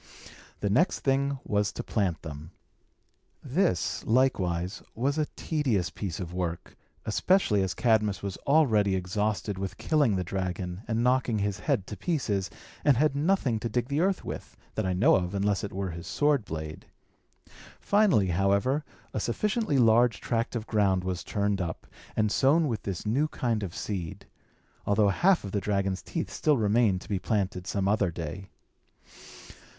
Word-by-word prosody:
The 100 Hz, -, 0 dB
next 155 Hz, -, +2 dB
thing 140 Hz, +1 st, +1 dB
was 105 Hz, -1 st, 0 dB
to -, -, -5 dB
plant 95 Hz, -7 st, -1 dB
them. 80 Hz, 0 st, -8 dB, 0.9 s
This, 140 Hz, -, 0 dB
likewise, 95 Hz, -7 st, +1 dB
was 140 Hz, +6 st, 0 dB
a 150 Hz, -, +1 dB
tedious 130 Hz, -, 0 dB
piece 95 Hz, -6 st, -5 dB
of 90 Hz, -1 st, -5 dB
work, 85 Hz, -2 st, -4 dB, 0.3 s
especially 110 Hz, -, +2 dB
as 95 Hz, -1 st, -1 dB
Cadmus 105 Hz, -5 st, +2 dB
was 100 Hz, -2 st, -3 dB
already 110 Hz, -10 st, +4 dB
exhausted 100 Hz, +2 st, -2 dB
with 95 Hz, -1 st, -4 dB
killing 145 Hz, -10 st, +2 dB
the 90 Hz, -, -1 dB
dragon 90 Hz, 0 st, -3 dB
and 115 Hz, 0 st, 0 dB
knocking 125 Hz, -2 st, +2 dB
his 100 Hz, -1 st, -1 dB
head 95 Hz, -, 0 dB
to 105 Hz, -, -7 dB
pieces, 105 Hz, -, -1 dB, 0.3 s
and 145 Hz, -4 st, +4 dB
had 150 Hz, +1 st, +2 dB
nothing 145 Hz, -, +1 dB
to 115 Hz, -, -3 dB
dig 120 Hz, +3 st, -1 dB
the 140 Hz, +2 st, 0 dB
earth 190 Hz, +1 st, 0 dB
with, -, -, -7 dB, 0.2 s
that 110 Hz, -3 st, -1 dB
I 95 Hz, -, 0 dB
know 130 Hz, -, +5 dB
of, 90 Hz, +2 st, -3 dB
unless 100 Hz, 0 st, 0 dB
it 105 Hz, -, -4 dB
were 95 Hz, -1 st, -3 dB
his 85 Hz, +2 st, -8 dB
sword 145 Hz, -, +2 dB
blade. 80 Hz, -1 st, -6 dB, 0.9 s
Finally, 200 Hz, -, +3 dB
however, 100 Hz, -, +1 dB, 0.3 s
a -, -, -1 dB
sufficiently 210 Hz, -, 0 dB
large 115 Hz, -1 st, +4 dB
tract 115 Hz, +1 st, -2 dB
of 110 Hz, -2 st, -3 dB
ground 100 Hz, -5 st, +2 dB
was 90 Hz, -1 st, -3 dB
turned 100 Hz, -2 st, -1 dB
up, 85 Hz, -2 st, -4 dB, 0.3 s
and 110 Hz, -1 st, +1 dB
sown 150 Hz, +7 st, +3 dB
with 115 Hz, -5 st, -2 dB
this 95 Hz, -1 st, -5 dB
new 135 Hz, +9 st, +2 dB
kind 120 Hz, -7 st, -1 dB
of 95 Hz, -4 st, -5 dB
seed; 90 Hz, -6 st, -5 dB, 0.6 s
although 100 Hz, 0 st, +3 dB
half 180 Hz, -, +3 dB
of 100 Hz, -, -6 dB
the 100 Hz, -, -1 dB
dragon's 100 Hz, -2 st, -1 dB
teeth 165 Hz, -, -4 dB
still 150 Hz, -2 st, +2 dB
remained 105 Hz, -3 st, +2 dB
to -, -, -12 dB
be 100 Hz, -3 st, 0 dB
planted 95 Hz, -3 st, -1 dB
some 100 Hz, -1 st, -1 dB
other 100 Hz, -2 st, +2 dB
day. 85 Hz, +3 st, -6 dB
105 Hz, 165 wpm, -28 LUFS, 95-130 Hz, 0.9 s, know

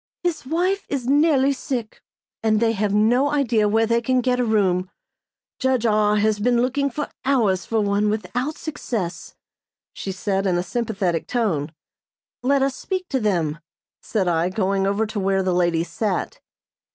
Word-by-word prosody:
His 330 Hz, -7 st, -2 dB
wife 365 Hz, +6 st, 0 dB
is 270 Hz, -4 st, -2 dB
nearly 280 Hz, 0 st, +3 dB
sick, 245 Hz, -4 st, -5 dB, 0.4 s
and 215 Hz, -1 st, +2 dB
they 230 Hz, 0 st, +3 dB
have 210 Hz, -2 st, -1 dB
no 235 Hz, +7 st, +3 dB
idea 235 Hz, -8 st, +2 dB
where 225 Hz, +2 st, +3 dB
they 235 Hz, +1 st, +1 dB
can 255 Hz, +2 st, +1 dB
get 250 Hz, 0 st, +1 dB
a -, -, +2 dB
room. 190 Hz, -5 st, +1 dB, 0.7 s
Judge 260 Hz, -3 st, +1 dB
R. 210 Hz, -1 st, +3 dB
has 210 Hz, 0 st, +2 dB
been 240 Hz, +2 st, +2 dB
looking 270 Hz, +3 st, 0 dB, 0.3 s
hours 215 Hz, -10 st, +1 dB
for 225 Hz, -1 st, +1 dB
one 205 Hz, +1 st, +1 dB
without 250 Hz, +7 st, -2 dB
success," 225 Hz, -, -5 dB, 0.6 s
she 195 Hz, -, -5 dB
said, 195 Hz, +1 st, -1 dB
in 180 Hz, -2 st, +2 dB
a 175 Hz, -, 0 dB
sympathetic 195 Hz, -5 st, -2 dB
tone. 170 Hz, -, -1 dB, 0.7 s
"Let 270 Hz, +2 st, +2 dB
us 270 Hz, -1 st, 0 dB
speak 370 Hz, +3 st, -4 dB
to 265 Hz, -, 0 dB
them," 170 Hz, -8 st, 0 dB, 0.4 s
said 200 Hz, -5 st, -1 dB
I, 170 Hz, 0 st, +1 dB
going 195 Hz, 0 st, 0 dB
over 200 Hz, +3 st, +1 dB
to 215 Hz, -1 st, -4 dB
where 195 Hz, 0 st, +1 dB
the 185 Hz, -1 st, 0 dB
ladies 175 Hz, -1 st, +1 dB
sat. 205 Hz, -5 st, -2 dB
220 Hz, 165 wpm, -22 LUFS, 195-255 Hz, 0.7 s, nearly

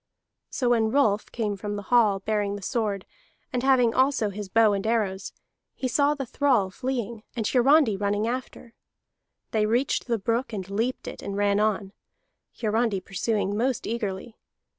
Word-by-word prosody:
So 250 Hz, -3 st, -1 dB
when 225 Hz, -2 st, +3 dB
Rolf 220 Hz, -5 st, +1 dB
came 215 Hz, -3 st, -2 dB
from 205 Hz, +1 st, -5 dB
the 205 Hz, -, -5 dB
hall, 210 Hz, -5 st, +4 dB
bearing 205 Hz, -1 st, -1 dB
the 200 Hz, -, -8 dB
sword, 210 Hz, -4 st, -2 dB, 0.5 s
and 250 Hz, -, 0 dB
having 255 Hz, -3 st, +4 dB
also 260 Hz, -5 st, +2 dB
his 200 Hz, 0 st, -7 dB
bow 220 Hz, +1 st, +4 dB
and 200 Hz, +1 st, -2 dB
arrows, 200 Hz, -4 st, -1 dB, 0.4 s
he 260 Hz, -, -2 dB
saw 285 Hz, +3 st, +2 dB
the 275 Hz, -2 st, -4 dB
thrall 245 Hz, -7 st, +1 dB
fleeing, 235 Hz, -2 st, -3 dB
and 225 Hz, -3 st, -2 dB
Hiarandi 255 Hz, -2 st, +4 dB
running 205 Hz, +2 st, 0 dB
after. 245 Hz, -1 st, -5 dB, 0.8 s
They 215 Hz, -1 st, +1 dB
reached 245 Hz, +5 st, 0 dB
the 235 Hz, -2 st, +1 dB
brook, 230 Hz, +4 st, -1 dB
and 190 Hz, -3 st, -4 dB
leaped 230 Hz, +5 st, -2 dB
it, -, -, -7 dB
and 200 Hz, 0 st, -5 dB
ran 205 Hz, 0 st, +2 dB
on, 210 Hz, -2 st, 0 dB, 0.7 s
Hiarandi 220 Hz, -2 st, +1 dB
pursuing 205 Hz, +1 st, -2 dB
most 250 Hz, +3 st, 0 dB
eagerly. 220 Hz, -1 st, -4 dB
220 Hz, 160 wpm, -26 LUFS, 205-245 Hz, 0.8 s, hall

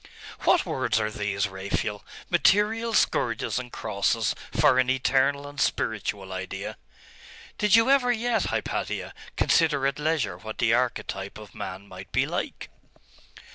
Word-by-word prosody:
'What -, -, +4 dB
words -, -, 0 dB
are 110 Hz, 0 st, -1 dB
these, 100 Hz, -2 st, -1 dB
Raphael? 100 Hz, +2 st, -3 dB, 0.2 s
Material 220 Hz, +3 st, +3 dB
scourges 115 Hz, -, +1 dB
and 125 Hz, -1 st, -8 dB
crosses 110 Hz, +1 st, 0 dB, 0.2 s
for 140 Hz, -4 st, +4 dB
an 130 Hz, 0 st, +2 dB
eternal 135 Hz, +2 st, +2 dB
and 145 Hz, 0 st, -5 dB
spiritual 100 Hz, -3 st, -1 dB
idea?' 95 Hz, 0 st, -5 dB, 0.8 s
'Did 210 Hz, 0 st, +5 dB
you 230 Hz, +1 st, +5 dB
ever 255 Hz, -3 st, +4 dB
yet, 240 Hz, 0 st, 0 dB
Hypatia, -, -, -3 dB, 0.2 s
consider 150 Hz, -5 st, +3 dB
at 140 Hz, +1 st, 0 dB
leisure 150 Hz, -, 0 dB
what 110 Hz, +3 st, -7 dB
the 115 Hz, -2 st, +3 dB
archetype 110 Hz, -5 st, -1 dB
of 105 Hz, -3 st, -12 dB
man 95 Hz, +2 st, -7 dB
might 95 Hz, 0 st, -11 dB
be -, -, +2 dB
like? -, -, -4 dB
120 Hz, 135 wpm, -26 LUFS, 100-150 Hz, 0.8 s, Did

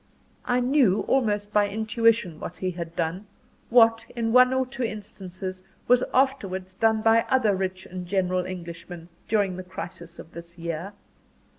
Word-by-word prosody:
I 250 Hz, 0 st, +1 dB
knew, 245 Hz, -6 st, +3 dB
almost 210 Hz, -5 st, 0 dB
by 205 Hz, -1 st, +3 dB
intuition, 220 Hz, -5 st, +1 dB
what -, -, -6 dB
he 185 Hz, -1 st, -2 dB
had 170 Hz, -1 st, -7 dB
done 175 Hz, +5 st, -2 dB, 0.4 s
what, 225 Hz, -1 st, +5 dB
in 225 Hz, -1 st, -1 dB
one 255 Hz, 0 st, +7 dB
or 260 Hz, 0 st, +1 dB
two 255 Hz, +1 st, -8 dB
instances, 190 Hz, -4 st, -6 dB, 0.3 s
was 250 Hz, 0 st, +5 dB
afterwards 195 Hz, -9 st, 0 dB
done 220 Hz, +2 st, +2 dB
by 225 Hz, 0 st, +5 dB
other 230 Hz, -6 st, +3 dB
rich 185 Hz, 0 st, -3 dB
and 180 Hz, -1 st, -7 dB
generous 185 Hz, -1 st, 0 dB
Englishmen, 170 Hz, -1 st, -8 dB, 0.2 s
during 200 Hz, -4 st, +1 dB
the 185 Hz, -, -6 dB
crisis 175 Hz, -2 st, -9 dB
of 165 Hz, -, -11 dB
this 170 Hz, +1 st, -11 dB
year. 170 Hz, +3 st, -5 dB
195 Hz, 155 wpm, -25 LUFS, 180-230 Hz, 0.4 s, one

